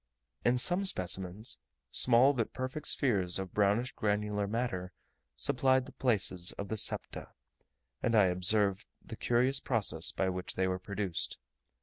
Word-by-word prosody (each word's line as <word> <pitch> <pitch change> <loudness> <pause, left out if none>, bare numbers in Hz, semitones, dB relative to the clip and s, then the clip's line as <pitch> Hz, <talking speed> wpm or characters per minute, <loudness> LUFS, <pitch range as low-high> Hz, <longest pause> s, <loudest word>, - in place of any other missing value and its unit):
In 120 +1 +2
some 175 +10 +1
specimens, 95 - 0 0.3
small 125 +3 +4
but 115 -5 -3
perfect 130 +4 -5
spheres 100 - +3
of 95 -1 -6
brownish 105 +5 +1
granular 105 -1 -2
matter 100 -5 -3 0.4
supplied 130 -1 +1
the - - -12
places 95 -8 0
of 100 - -7
the 110 - -2
septa; - - -1 0.7
and 115 - 0
I 105 -3 +5
observed 95 +2 +1 0.2
the - - -8
curious 125 +3 +1
process 105 -9 +2
by 95 - -1
which 90 0 -4
they 95 0 0
were 95 0 -2
produced. 100 -2 -4
105 Hz, 140 wpm, -31 LUFS, 95-125 Hz, 0.7 s, I